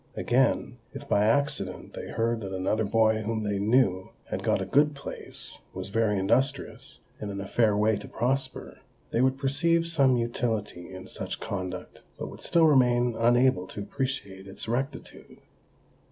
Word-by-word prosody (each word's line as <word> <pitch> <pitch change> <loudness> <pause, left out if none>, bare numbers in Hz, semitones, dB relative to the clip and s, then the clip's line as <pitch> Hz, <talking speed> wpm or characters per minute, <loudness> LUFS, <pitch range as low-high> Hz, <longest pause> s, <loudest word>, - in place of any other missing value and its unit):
Again, 125 0 +1
if - - -8
by 105 +1 +3
accident 140 +6 0
they - - -6
heard 115 0 0
that 95 -2 -5
another 105 +4 0
boy 110 +1 +3
whom 110 0 -2
they 105 -1 -1
knew, 100 -4 +2 0.2
had - - -3
got - - +2
a - - -2
good 150 +1 +3
place, 140 - -8 0.2
was - - -5
very 105 -1 +1
industrious, 130 +8 0 0.2
and 105 - -5
in 100 0 -5
a 100 - -4
fair 105 -1 +2
way 105 0 +3
to 105 - -9
prosper, 130 +2 -2 0.3
they 115 - +2
would 130 +1 +2
perceive 165 +5 +2
some 135 -6 +4
utility 110 -6 -2
in 95 0 -9
such - - -5
conduct, 95 -3 -5 0.2
but - - -5
would - - -12
still 165 -1 +4
remain 125 -5 +4
unable 120 -5 +3
to 105 - -7
appreciate 100 -4 -4
its 95 - -7
rectitude. 130 +4 -4
115 Hz, 165 wpm, -27 LUFS, 100-130 Hz, 0.3 s, some